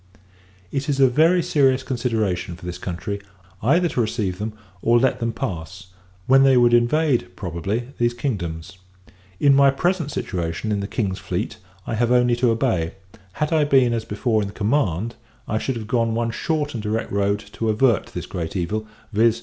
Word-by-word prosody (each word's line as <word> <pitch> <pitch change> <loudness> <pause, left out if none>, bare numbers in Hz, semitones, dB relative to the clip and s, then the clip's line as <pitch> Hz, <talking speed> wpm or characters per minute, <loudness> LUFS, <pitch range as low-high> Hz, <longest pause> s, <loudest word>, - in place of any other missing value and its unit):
It 140 +1 -2
is 140 -1 0
a 135 - +7
very 165 +7 +4
serious 135 -4 +2
consideration 110 -9 -1
for 90 +1 -13
this 90 0 -5
country, 100 +3 -4 0.4
either 170 - +3
to 125 - 0
receive 105 -5 -2
them, 105 +1 -3 0.3
or 120 +1 +4
let 130 +2 +2
them 115 0 -1
pass; 95 -3 -6 0.4
when 135 +1 +6
they 135 -1 +5
would 120 -1 +5
invade, 120 - +3
probably, 95 +8 -3
these 120 0 +1
kingdoms. 95 - -4 0.6
In 140 -1 +5
my 140 0 +6
present 165 +3 0
situation 90 - -3
in 105 - 0
the 100 - -3
King's 100 -4 -2
fleet, 90 +4 -3 0.3
I - - -3
have 120 +2 +1
only 125 -1 +4
to 125 0 +3
obey; 115 -9 0 0.4
had 150 +2 -1
I 155 -2 +4
been, 130 -4 +4
as 115 -1 -1
before, 115 -1 0
in 100 - -2
the 100 - -10
command, 110 - 0 0.3
I 110 - 0
should 130 - -2
have 115 -2 -5
gone 115 -1 0
one 115 0 0
short 150 +4 -2
and 115 - -4
direct 110 +2 -2
road 100 0 +1 0.2
to 115 - -1
avert 110 0 +2
this - - -6
great 85 +1 -5
evil: 105 +5 -2 0.3
_viz. 115 +2 +3
115 Hz, 185 wpm, -22 LUFS, 100-130 Hz, 0.6 s, a